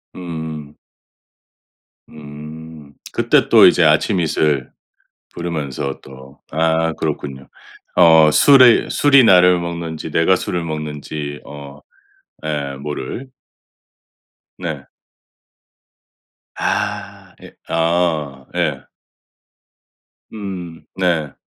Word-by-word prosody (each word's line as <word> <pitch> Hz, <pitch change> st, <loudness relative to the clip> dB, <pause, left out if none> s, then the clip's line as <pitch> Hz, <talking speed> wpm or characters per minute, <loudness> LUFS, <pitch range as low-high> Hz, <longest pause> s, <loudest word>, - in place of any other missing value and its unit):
으음. 80 Hz, -4 st, -7 dB, 1.3 s
음 75 Hz, 0 st, -11 dB, 0.2 s
그때 -, -, +2 dB
또 -, -, +7 dB
이제 -, -, +5 dB
아침 95 Hz, -, +2 dB
이슬 75 Hz, -5 st, 0 dB, 0.6 s
부르면서 75 Hz, -5 st, -4 dB
또 65 Hz, +1 st, -14 dB
아 80 Hz, +1 st, +1 dB
그렇군요. 70 Hz, -4 st, -5 dB, 0.5 s
어 80 Hz, -2 st, +6 dB
술이 130 Hz, -, +6 dB
술이 140 Hz, -3 st, +5 dB
나를 90 Hz, -3 st, +5 dB
먹는지, 85 Hz, -2 st, -5 dB
내가 85 Hz, +3 st, +3 dB
술을 90 Hz, -1 st, -3 dB
먹는지 75 Hz, -2 st, -6 dB
어 70 Hz, 0 st, -11 dB, 0.7 s
예 70 Hz, -3 st, -3 dB
모를. 75 Hz, -, -6 dB, 1.3 s
네. -, -, -6 dB, 1.7 s
아 -, -, -3 dB
예 -, -, -14 dB
어 80 Hz, -5 st, -1 dB
예. -, -, -1 dB, 1.5 s
음 95 Hz, -6 st, -8 dB
네. 85 Hz, -6 st, -1 dB
80 Hz, 140 characters per minute, -18 LUFS, 75-85 Hz, 1.7 s, 또